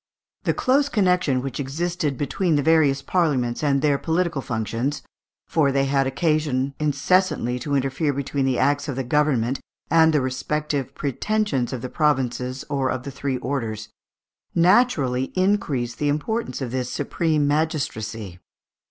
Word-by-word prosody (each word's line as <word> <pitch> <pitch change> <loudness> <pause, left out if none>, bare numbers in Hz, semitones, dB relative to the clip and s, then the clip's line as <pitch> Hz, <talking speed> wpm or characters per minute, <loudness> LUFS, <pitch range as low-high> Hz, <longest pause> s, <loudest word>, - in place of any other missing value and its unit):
The - - +2
close 275 +2 +2
connection 180 - +2
which 135 +1 -4
existed 150 0 -2
between 160 +5 0
the 145 - +1
various 145 -3 +3
Parliaments 140 -9 0
and 140 -2 +2
their 145 -2 +3
political 165 -3 0
functions 120 +4 -2 0.4
for 145 -4 +2
they 135 0 +2
had 135 0 +1
occasion 140 -2 0
incessantly 150 -3 +1
to 140 +3 -2
interfere 135 +2 0
between 140 0 -2
the 130 -2 +1
acts 145 +1 +1
of 140 - -3
the 135 - -2
government 135 -2 +1 0.3
and 160 0 +6
the 150 - +3
respective 135 +1 -2
pretensions 145 - -1
of 130 -2 -5
the - - -2
provinces 130 -3 0
or 135 -3 0
of 130 -1 -2
the 140 - -6
three 135 0 -2
orders 115 -5 -3 0.7
naturally 170 - +3
increased 155 -11 0
the 145 - +1
importance 150 - -2
of 120 - -4
this 125 -1 -2
supreme 150 0 0
magistracy. 115 - -2
140 Hz, 145 wpm, -23 LUFS, 130-155 Hz, 0.7 s, and